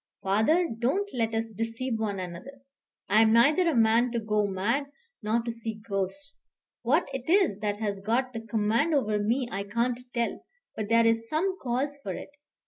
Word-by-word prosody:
"Father, 220 - +3
don't 325 - +1
let 225 -3 -1
us 225 0 -2
deceive 225 +2 -3
one 205 -3 -2
another. 185 +10 -8 0.5
I 215 +2 +5
am 220 -1 +5
neither 300 +10 +5
a 315 - 0
man 230 +2 +4
to 235 - 0
go 210 -1 0
mad 210 +9 -1 0.3
nor 225 +2 0
to 235 - -3
see 225 -1 -6
ghosts. 200 +9 -3 0.4
What 290 +9 +2
it 265 +2 -5
is 355 - +3
that 205 -1 -2
has 205 -3 -2
got 240 +6 0
the 225 - -4
command 225 +8 +1
over 215 -6 +1
me 235 +5 0
I 195 - -2
can't 235 +4 -1
tell; 235 -1 -2 0.3
but 215 -1 -4
there 230 0 +5
is 230 0 +2
some 370 +5 0
cause 270 +4 -2
for 195 -6 -4
it. - - -9
230 Hz, 185 wpm, -28 LUFS, 215-265 Hz, 0.5 s, I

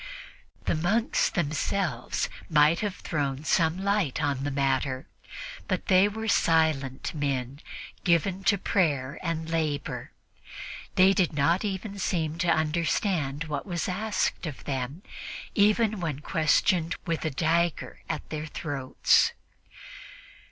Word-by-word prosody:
The - - +1
monks 200 +9 +1
themselves 155 -3 -1 0.2
might 155 +1 +5
have 205 -3 -2
thrown 140 -3 -2
some 160 +1 +2
light 200 -9 +1
upon 140 -3 -1
the 145 - -1
matter, 135 -1 0 0.6
but - - -1
they 185 +1 +6
were 220 +2 -4
silent 155 -8 +2
men, 140 -3 -2 0.4
given 180 +3 +2
to 200 - +4
prayer 145 -9 0
and 165 -2 -2
labor; 155 -3 -2 0.8
they 190 +1 +6
did 185 -5 +1
not 150 +5 +2 0.4
seem 165 -4 -1
to 175 -1 +1
understand 160 -1 +1
what 150 -1 -4
was 175 -3 -2
asked 185 -2 -1
of 145 - -7
them, 135 +5 -4 0.5
even 215 +1 +3
when 155 -5 -3
questioned 160 +2 +2
with 165 -2 -1
a 160 - 0
dagger 165 +3 0
at - - -3
their 155 0 -4
throats. 140 -4 +2
160 Hz, 120 wpm, -27 LUFS, 145-185 Hz, 0.8 s, they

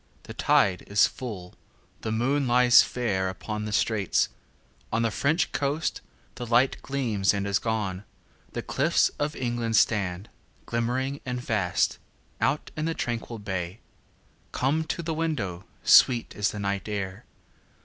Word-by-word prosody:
The - - -9
tide 95 -2 +2
is 100 0 +5
full, 100 -9 -6 0.5
the 110 - -3
moon 130 +5 +1
lies 125 0 +7
fairUpon 105 -2 -2
the - - -4
straits;—on 110 +2 -2
the 115 - +1
French 155 +9 +1
coast 145 +3 -1 0.3
the 120 - -6
lightGleams 120 -4 +1
and 100 0 -2
is 100 0 +1
gone; 105 -4 -2 0.5
the - - -4
cliffs - - +2
of 145 +1 -1
England 120 -2 -1
stand, 100 -3 +2 0.4
Glimmering 130 +4 -1
and 125 -1 -3
vast, 105 -7 0 0.4
out 140 +3 0
in 155 - -2
the 165 0 -1
tranquil 120 -1 -3
bay. 95 -2 -4 0.7
Come 150 +5 0
to 170 - -3
the 165 0 -2
window, 115 - -2 0.2
sweet 120 -3 +5
is 105 -1 +1
the - - -6
night 100 0 -2
air! 95 -3 -4
115 Hz, 135 wpm, -26 LUFS, 100-130 Hz, 0.7 s, lies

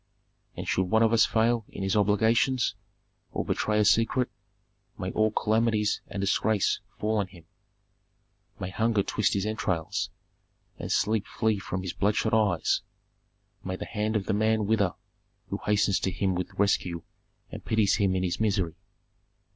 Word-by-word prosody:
"And - - -5
should 95 - +1
one 110 +3 +4
of 115 0 +3
us 115 -1 +5
fail 115 +1 +2
in 95 - -6
his 95 +1 0
obligations, 110 +5 +2 0.6
or - - -2
betray 105 0 0
a 105 - +3
secret, 115 +4 +2 0.7
may 95 +1 -3
all 110 0 +2
calamities 110 0 +1
and 100 - -6
disgrace 100 +1 +1 0.2
fall 110 +1 0
on 100 - -1
him! 85 -3 -16 1.1
May 95 0 -4
hunger 110 0 +1
twist 105 - 0
his 100 0 0
entrails, 95 -6 -2 0.7
and - - -5
sleep 105 +1 +1
flee 110 -2 0
from 95 -1 -4
his 90 - -4
bloodshot 105 +2 0
eyes! 105 -6 +2 0.8
May 95 0 -3
the - - -6
hand 110 0 -2
of 100 -3 0
the - - 0
man 110 +1 +2
wither 100 -4 +1 0.5
who - - -3
hastens 105 -2 +3
to - - -1
him 95 +1 0
with 90 0 -3
rescue 90 -4 0 0.5
and - - -8
pities 110 -3 +2
him 100 -3 +2
in 95 - 0
his 90 -2 -1
misery! 100 -6 0
105 Hz, 160 wpm, -27 LUFS, 95-110 Hz, 1.1 s, us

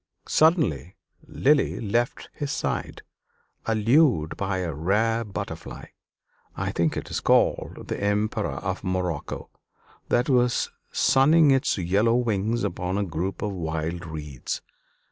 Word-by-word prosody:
Suddenly 145 - +2 0.3
Lily 145 +2 +2
left 120 +3 -1
his 145 -1 -4
side, - - -3 0.6
allured 115 - +3
by 95 -1 -2
a 90 -3 -2
rare 110 +9 +1
butterfly 105 -3 -7 0.7
I - - -1
think 85 -2 0
it - - -6
is - - -1
called - - +1
the - - -4
Emperor 105 +1 0
of - - -3
Morocco 90 -5 -3 0.6
that 120 0 +2
was 125 -3 +2 0.2
sunning 150 +3 +5
its 135 -2 +2
yellow 100 +6 +2
wings 115 -1 0
upon 90 +2 -2
a 100 - 0
group 90 +3 -3
of 105 - -1
wild 85 -1 -3
reeds. 75 -5 -5
100 Hz, 125 wpm, -25 LUFS, 85-120 Hz, 0.7 s, sunning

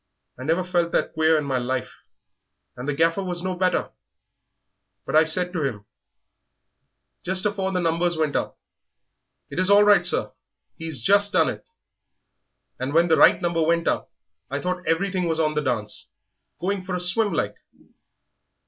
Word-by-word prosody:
I - - -6
never 165 +4 +1
felt 175 -2 0
that - - 0
queer 160 0 +3
in 150 - -1
my 135 -2 -1
life 125 +1 -4 0.7
and 125 +3 -7
the - - 0
Gaffer 165 +5 +1
was 175 -1 -4
no 185 0 -2
better; 180 0 0 1.1
but - - -3
I 160 +1 +6
said 180 +3 0
to 170 - -2
him, 115 -8 -3 1.4
just 185 +1 +2
afore 195 -2 -1
the 185 - -1
numbers 170 0 0
went 155 -2 -1
up, - - -2 0.9
'It - - -4
is 185 +1 +1
all 205 +1 +7
right, 205 0 +5
sir, - - +1 0.4
he's 160 -3 -3
just 200 +1 +3
done - - +3
it,' - - -8 1.1
and 135 +4 -3
when 170 +1 +4
the 160 - +4
right - - +6
number 170 -1 0
went 170 +1 +1
up - - -1 0.4
I 140 +2 -3
thought 180 +2 -4
everything 180 +1 0
was 160 -1 -1
on 155 -1 +1
the 150 - 0
dance, 120 -7 -3 0.5
going 190 +2 -2
for 180 -1 -3
swim 195 +4 +2
like. - - -2
170 Hz, 165 wpm, -23 LUFS, 155-185 Hz, 1.4 s, all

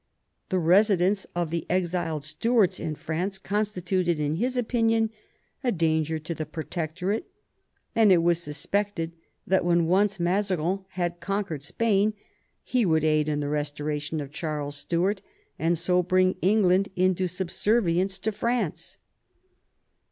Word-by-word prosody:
The 185 - +1
residence 190 +2 +3
of 170 -2 -1
the 170 -1 -3
exiled 170 -4 -1
Stuarts 205 +6 +1
in 155 - -3
France 180 +6 -3
constituted 185 -4 -1
in 150 +1 0
his 250 +5 -1
opinion 225 -2 +1 0.5
a 250 - +2
danger 160 -3 +1
to 155 +2 -5
the 155 -2 -5
Protectorate, 170 - -3 0.7
and 220 -3 +5
it 170 -3 +5
was 170 0 +2
suspected 165 +3 -2 0.3
that 190 0 +2
when 170 -1 +3
once 195 +3 +2
Mazarin 185 0 0
had 175 -1 -2
con 200 +3 -1
quered 155 -6 -5
Spain 210 +6 +1 0.5
he 250 -2 +1
would 160 -5 +2
aid 155 -1 +2
in 150 -1 -1
the 145 - -2
restoration 150 +1 -2
of 140 -2 -6
Charles 150 -2 -4
Stuart, 175 +7 0 0.4
and 170 +1 +1
so 180 +2 +2
bring 185 +1 +2
England 195 -1 +3
into 185 0 +2
subservience 190 +1 0
to 205 +4 -2
France. 230 -4 -2
180 Hz, 135 wpm, -26 LUFS, 160-200 Hz, 0.7 s, and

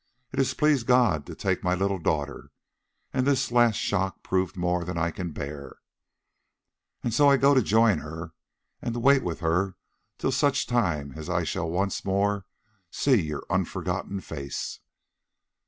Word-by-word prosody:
It - - -3
has 130 -1 +1
pleased 145 -4 +2
God 120 - +3
to - - -7
take - - -1
my 90 0 +2
little 95 +1 0
daughter, 75 -3 -2 0.6
and 130 0 +1
this 135 -4 +2
last 120 -2 +4
shock 95 -2 -1
proved 95 0 -1
more 90 0 0
than 90 0 -4
I 85 +1 0
can 90 -2 -5
bear, 75 -1 -7 1.3
and 120 - -1
so 145 +3 +5
I 140 - +5
go 140 +1 +5
to 130 - +5
join 110 -1 +3
her 80 +2 -7 0.5
and 120 - -3
to - - -2
wait 135 +2 +5
with 85 -2 -4
her 90 +3 +1 0.4
till 135 - 0
such 140 +1 +2
time 85 - 0
as 80 +2 -7
I 90 -1 +1
shall 80 0 -2
once 95 +4 -1
more 100 0 0 0.4
see 130 +3 +2
your 75 -2 -5
unforgotten 100 -1 -2
face. 70 -6 -5
95 Hz, 165 wpm, -26 LUFS, 85-120 Hz, 1.3 s, so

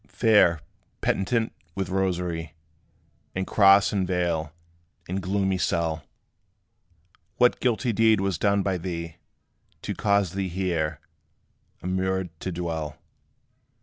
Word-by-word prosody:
Fair 100 -8 +4 0.4
penitent, 110 +4 0 0.2
with 95 -2 -2
rosary, 90 -4 -2 0.8
And 95 0 -1
cross 100 0 +5
and 95 -2 0
veil, 85 -4 -1 0.6
in 95 +2 -2
gloomy 95 0 0
cell, 80 -3 0 1.3
What 125 0 +4
guilty 120 -1 +1
deed 110 0 +4
was 95 -5 -1
done 100 -1 +2
by 95 -2 -1
thee, 85 -2 -5 0.7
To - - -2
cause 100 -4 +1
thee 95 -1 -2
here 85 -4 -1 0.8
immured 95 0 -1
to 95 - -4
dwell? 80 -3 -4
95 Hz, 110 wpm, -26 LUFS, 85-100 Hz, 1.3 s, cross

